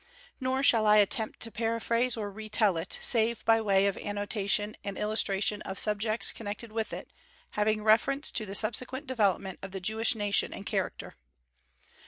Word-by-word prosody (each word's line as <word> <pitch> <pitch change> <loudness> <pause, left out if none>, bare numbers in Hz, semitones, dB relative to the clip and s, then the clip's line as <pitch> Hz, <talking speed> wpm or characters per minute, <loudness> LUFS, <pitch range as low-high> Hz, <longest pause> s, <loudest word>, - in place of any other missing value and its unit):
Nor 260 0 -1
shall 225 -5 +4
I 210 0 +6
attempt 215 +1 +1
to 230 - -1
paraphrase 230 +2 -1
or 205 -2 -4
re 215 +2 -9
tell 210 -3 +2
it, 165 +2 -3
save 230 -1 +2
by 225 0 +4
way 195 -2 +2
of 200 -1 0
annotation 205 0 -2
and 200 -1 -5
illustration 210 -1 +1
of 190 - -6
subjects 215 +2 +1
connected 215 +1 -7
with 220 0 -3
it, - - -7 0.4
having 215 0 0
reference 250 +7 +2
to 215 - 0
the 195 - -4
subsequent 255 +6 +1
development 200 -7 -1
of 195 - -6
the 190 - -4
Jewish 220 +5 0
nation 205 -2 0
and - - -9
character. - - -4
215 Hz, 170 wpm, -29 LUFS, 205-230 Hz, 0.4 s, I